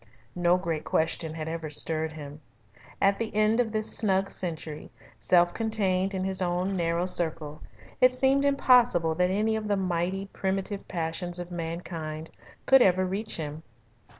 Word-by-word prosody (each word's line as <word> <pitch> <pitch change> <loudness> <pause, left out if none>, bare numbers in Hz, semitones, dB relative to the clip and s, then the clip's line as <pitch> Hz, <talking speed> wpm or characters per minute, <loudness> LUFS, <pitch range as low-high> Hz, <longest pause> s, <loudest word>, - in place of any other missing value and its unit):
No 175 0 +3
great 165 -4 -3
question 160 0 -1
had 155 -1 -5
ever 160 -1 -4
stirred 160 +1 +1
him. 150 -1 -9 0.6
At 195 0 +3
the 230 -1 -2
end 215 +2 +3
of 235 -3 +1
this 215 0 -1
snug 195 -2 +1
century, 160 -4 -4 0.3
self 175 -1 +3
contained 195 -4 0
in 185 - -2
his 190 0 0
own 180 +2 0
narrow 170 0 0
circle, 160 -4 -3 0.4
it 255 0 +7
seemed 265 +2 +2
impossible 245 - +4
that 180 +2 +1
any 215 +3 +1
of 215 -1 -3
the 205 -1 +1
mighty, 185 +1 -1
primitive 195 +1 -2
passions 175 0 -3
of 175 0 -7
mankind 165 -2 -5 0.3
could 270 -1 +6
ever 185 -3 +4
reach 200 +4 -3
him. 155 -1 -5
180 Hz, 155 wpm, -27 LUFS, 165-205 Hz, 0.6 s, it